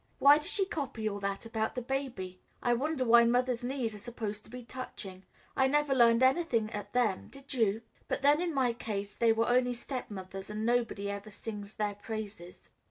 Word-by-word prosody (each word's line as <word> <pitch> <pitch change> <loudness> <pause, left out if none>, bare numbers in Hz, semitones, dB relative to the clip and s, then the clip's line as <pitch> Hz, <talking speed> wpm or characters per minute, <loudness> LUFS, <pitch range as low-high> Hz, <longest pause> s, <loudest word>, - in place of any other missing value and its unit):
Why 285 +2 +7
does 305 - -6
she 390 - +1
copy 275 - -3
all 205 -1 -2
that 200 +2 -3
about 220 -1 -2
the 250 - -2
baby? 240 -9 -4 0.2
I 240 - +3
wonder 270 +2 0
why 235 0 +7
mothers' 245 +1 +2
knees 245 -3 -2
are 210 - -9
supposed 215 -2 -5
to - - -16
be 250 +1 -8
touching? 200 -7 -8 0.3
I 265 - +4
never 295 0 +2
learned 235 -1 +5
anything 260 -6 +2
at 205 - -6
them, 230 -6 +1
did 275 +1 -10
you? 225 -3 +1 0.2
But - - -2
then 290 +3 +5
in 355 -1 0
my 260 -5 +2
case 205 -3 -4
they 230 -1 +4
were 225 +1 +2
only 245 0 +3
stepmother's, 200 -7 -6
and 215 +1 -3
nobody 235 -4 +1
ever 200 +1 -6
sings 210 0 -7
their 210 -1 -1
praises." 205 -4 -7
235 Hz, 195 wpm, -31 LUFS, 210-260 Hz, 0.3 s, Why